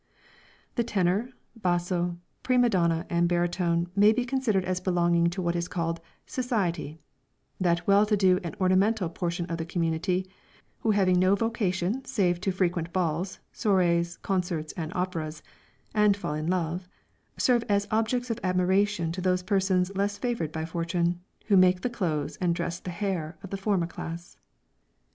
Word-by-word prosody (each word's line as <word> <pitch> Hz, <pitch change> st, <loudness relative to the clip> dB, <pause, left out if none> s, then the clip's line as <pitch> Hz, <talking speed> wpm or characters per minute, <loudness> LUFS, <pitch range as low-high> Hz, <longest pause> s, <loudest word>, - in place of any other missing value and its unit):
The 235 Hz, -, +3 dB
tenor, 205 Hz, +1 st, +1 dB, 0.3 s
basso, 175 Hz, -3 st, 0 dB, 0.2 s
prima 250 Hz, -2 st, +3 dB
donna 170 Hz, -3 st, +1 dB
and 170 Hz, 0 st, +1 dB
baritone 175 Hz, -1 st, +1 dB
may 205 Hz, +1 st, +6 dB
be 245 Hz, +2 st, 0 dB
considered 240 Hz, -7 st, 0 dB
as 185 Hz, 0 st, -1 dB
belonging 175 Hz, -2 st, +2 dB
to 185 Hz, +2 st, -4 dB
what 170 Hz, 0 st, 0 dB
is 170 Hz, 0 st, -1 dB
called 165 Hz, -1 st, -2 dB, 0.2 s
"society;" 185 Hz, -, -2 dB, 0.6 s
that 175 Hz, -2 st, +1 dB
well 200 Hz, +1 st, +5 dB
to 210 Hz, -1 st, +2 dB
do 185 Hz, -2 st, +4 dB
and 170 Hz, -, -5 dB
ornamental 190 Hz, +1 st, +2 dB
portion 175 Hz, 0 st, -3 dB
of 165 Hz, 0 st, -4 dB
the -, -, -1 dB
community, 175 Hz, +2 st, 0 dB, 0.5 s
who 225 Hz, -, -1 dB
having 190 Hz, -4 st, +3 dB
no 185 Hz, +2 st, +4 dB
vocation 205 Hz, +1 st, -1 dB
save 185 Hz, -9 st, 0 dB
to 195 Hz, -, 0 dB
frequent 175 Hz, -2 st, -1 dB
balls, 180 Hz, +1 st, -1 dB, 0.2 s
soirées, 175 Hz, -4 st, +1 dB
concerts 175 Hz, -5 st, -1 dB
and 160 Hz, -1 st, -4 dB
operas, 165 Hz, -4 st, -3 dB, 0.5 s
and 210 Hz, -2 st, +4 dB
fall 150 Hz, -, -3 dB
in 155 Hz, +1 st, -3 dB
love 180 Hz, 0 st, -1 dB, 0.5 s
serve 240 Hz, -2 st, +3 dB
as 200 Hz, 0 st, +2 dB
objects 230 Hz, +3 st, 0 dB
of 230 Hz, -, -3 dB
admiration 185 Hz, -1 st, +1 dB
to 185 Hz, +2 st, -4 dB
those 180 Hz, 0 st, +1 dB
persons 190 Hz, -1 st, +1 dB
less 200 Hz, +1 st, 0 dB
favoured 230 Hz, -9 st, -2 dB
by 160 Hz, 0 st, -3 dB
fortune, 170 Hz, +1 st, -1 dB, 0.2 s
who 205 Hz, -, +3 dB
make 185 Hz, -1 st, +5 dB
the 250 Hz, -, -1 dB
clothes 160 Hz, -10 st, -2 dB
and 175 Hz, -2 st, +1 dB
dress 170 Hz, 0 st, -3 dB
the 185 Hz, -, -7 dB
hair 175 Hz, -4 st, -3 dB
of 195 Hz, -, -9 dB
the -, -, -1 dB
former 195 Hz, -3 st, +1 dB
class. 170 Hz, 0 st, -8 dB
180 Hz, 160 wpm, -27 LUFS, 170-200 Hz, 0.6 s, may